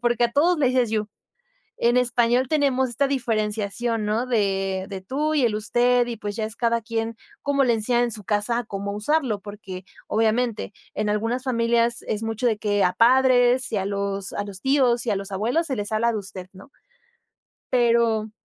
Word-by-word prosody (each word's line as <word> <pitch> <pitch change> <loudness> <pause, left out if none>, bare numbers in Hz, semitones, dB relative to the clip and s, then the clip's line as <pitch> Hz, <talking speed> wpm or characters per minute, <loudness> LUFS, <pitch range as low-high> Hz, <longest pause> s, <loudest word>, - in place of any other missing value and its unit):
porque 240 -1 +2
a 235 - -1
todos 330 +5 +3
le 280 - +3
dices 250 -3 +1
you. 215 -1 -1 0.7
En 240 +1 +3
español, 245 0 +2
tenemos 270 -3 +2
esta 245 +4 0
diferenciación, 225 -2 -1
¿no?, 215 +4 0
de 195 -5 0
de 195 -2 -6
tú 295 +10 -2
y 280 - +2
el 225 -3 +1
usted 240 +3 +2
y 235 - -4
pues 205 -1 -5
ya 220 - -2
es 220 +1 -5
cada 235 -1 0
quien 225 0 -3 0.3
como 280 -1 +2
le 245 - +3
enseñan 240 +2 +1
en 240 - -2
su 210 -1 -7
casa 210 +4 0
a 240 - -3
cómo 200 -1 -5
usarlo, 230 -1 0
porque 195 -2 -9 0.2
obviamente 225 0 0 0.2
en 210 0 -1
algunas 225 +5 -1
familias 235 -1 +1
es 215 0 -3
mucho 225 +2 -2
de 220 -3 +1
que 205 -1 +1
a 180 - +2
padres, 255 +1 +4
y - - 0
a 190 - -2
los 200 -1 -3
a 205 - -2
los 200 -2 -7
tíos, 255 -3 +2
y - - +1
a - - +1
los 195 0 -6
abuelos, 240 - 0
se 265 - -2
les 205 -1 -4
habla 225 +2 +2
de 220 - -2
usted, 190 -2 -7
¿no? 195 +8 -15 1.0
Pero 235 -3 +2
230 Hz, 200 wpm, -23 LUFS, 210-245 Hz, 1.0 s, padres